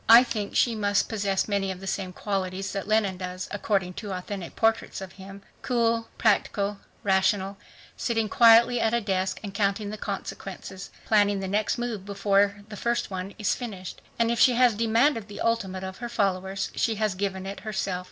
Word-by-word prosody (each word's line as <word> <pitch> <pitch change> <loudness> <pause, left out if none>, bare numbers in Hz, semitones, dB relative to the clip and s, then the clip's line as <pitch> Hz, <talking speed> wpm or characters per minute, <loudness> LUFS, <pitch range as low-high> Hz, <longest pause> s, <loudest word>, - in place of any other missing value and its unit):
I 230 +2 +10
think 215 -5 -4
she 240 - +3
must 205 -2 +1
possess 200 -3 0
many 200 -2 0
of 185 - -7
the 195 - -9
same 190 -1 -2
qualities 195 0 -3
that 195 -1 -4
Lenin 210 -3 +2
does, 185 0 -5
according 195 -3 0
to 205 -3 -5
authentic 185 -1 -6
portraits 225 0 +1
of 190 -1 -8
him 195 +1 -11 0.2
cool, 230 -2 +1
practical, 205 -2 +1 0.2
rational, 195 0 +2 0.4
sitting 225 -2 0
quietly 235 +1 +6
at 225 +1 +2
a - - +3
desk 190 -3 -1
and 200 -2 -6
counting 200 +1 0
the 215 - -7
consequences, 195 -1 -6 0.2
planning 205 -2 +3
the 190 - -3
next 210 +5 0
move 235 -5 -3
before 200 0 +1
the 210 - -7
first 235 0 -1
one 190 +1 -5
is 210 - +1
finished. 200 -7 -7 0.2
And 230 0 +2
if 235 - -1
she 255 - +6
has 245 -1 +5
demanded 230 +2 +2
the 205 - -9
ultimate 195 -5 -1
of 190 0 -6
her 240 0 -5
followers, 195 -3 -1
she 225 - 0
has 215 -2 0
given 190 0 -3
it 195 +1 -6
herself. 195 -4 -2
200 Hz, 185 wpm, -26 LUFS, 190-225 Hz, 0.4 s, I